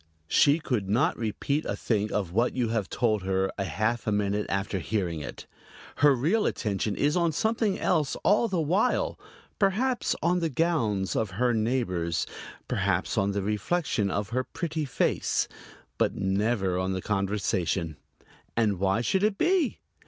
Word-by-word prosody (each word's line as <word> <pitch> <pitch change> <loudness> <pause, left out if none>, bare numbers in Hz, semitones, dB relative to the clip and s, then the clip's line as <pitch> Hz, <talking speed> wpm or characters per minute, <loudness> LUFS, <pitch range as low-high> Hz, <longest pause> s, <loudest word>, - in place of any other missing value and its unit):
She 145 +1 +5
could 125 - -2
not 110 +5 +2
repeat 140 +7 -1
a - - -2
thing 110 -2 -1
of 95 -5 -1
what 115 +6 +1
you 120 -3 0
have 110 -5 -1
told 110 -4 +1
her 95 0 0
a 100 - 0
half 110 +5 -1
minute 105 0 0
after 95 0 -1
hearing 90 -4 -2
it. - - -8 0.5
Her 145 -1 +5
real 170 - +2
attention 105 -1 -1
is 145 +3 +1
on 170 -2 +2
something 220 +4 0
else 155 -6 +1
all 210 +4 +4
the 190 -5 -1
while 185 +10 +1 0.4
perhaps 235 +6 +1
on 175 +2 +3
the 165 -2 0
gowns 120 - 0
of 110 -2 0
her 125 0 +2
neighbors, 110 -8 0 0.4
perhaps - - 0
on 100 - +2
the 100 -1 -1
reflection 105 - 0
of 100 +1 -2
her 130 +2 0
pretty 160 +1 -3
face 135 - 0 0.5
but - - +2
never 95 -1 0
on 95 +1 -1
the 95 - -3
conversation. 95 -5 -1 0.6
And 105 -5 +2
why 95 +3 +2
should 190 +10 +1
it 210 -1 +1
be? 355 -7 +1
110 Hz, 160 wpm, -27 LUFS, 100-160 Hz, 0.6 s, She